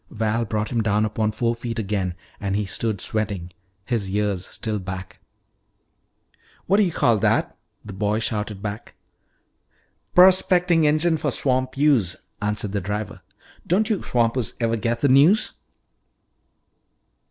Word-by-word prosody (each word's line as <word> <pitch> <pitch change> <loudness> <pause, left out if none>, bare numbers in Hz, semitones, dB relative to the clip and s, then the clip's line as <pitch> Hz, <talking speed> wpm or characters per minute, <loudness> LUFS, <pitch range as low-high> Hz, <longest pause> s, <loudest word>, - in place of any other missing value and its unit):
Val 110 +1 -1
brought 105 0 -2
him 120 -2 +1
down 105 0 +1
upon 110 0 -1
four 115 +2 0
feet 115 0 -5
again, 100 -5 -2 0.2
and 100 -1 -2
he 105 0 0
stood 110 +1 -2
sweating, 100 -4 -3 0.3
his 115 -6 -2
ears 100 -2 -1
still 110 -3 -4
back. 95 0 -7 1.5
"What 195 - +3
do 210 - +5
you 180 - 0
call 115 -8 +2
that?" - - +1 0.3
the 105 - -8
boy 105 +2 0
shouted 105 -2 -3
back. 105 +2 -6 1.2
"Prospecting 180 -3 +5
engine 160 +2 +2
for 150 - -1
swamp 130 0 -1
use," 135 - +3 0.3
answered 105 -1 -2
the 100 0 -2
driver. 105 +2 -4 0.5
"Don't 215 +6 +2
you 205 - 0
swampers 120 -1 0
ever 115 -1 +1
get 115 +1 -2
the 145 - +4
news?" 145 +11 +5
110 Hz, 140 wpm, -23 LUFS, 105-130 Hz, 1.5 s, do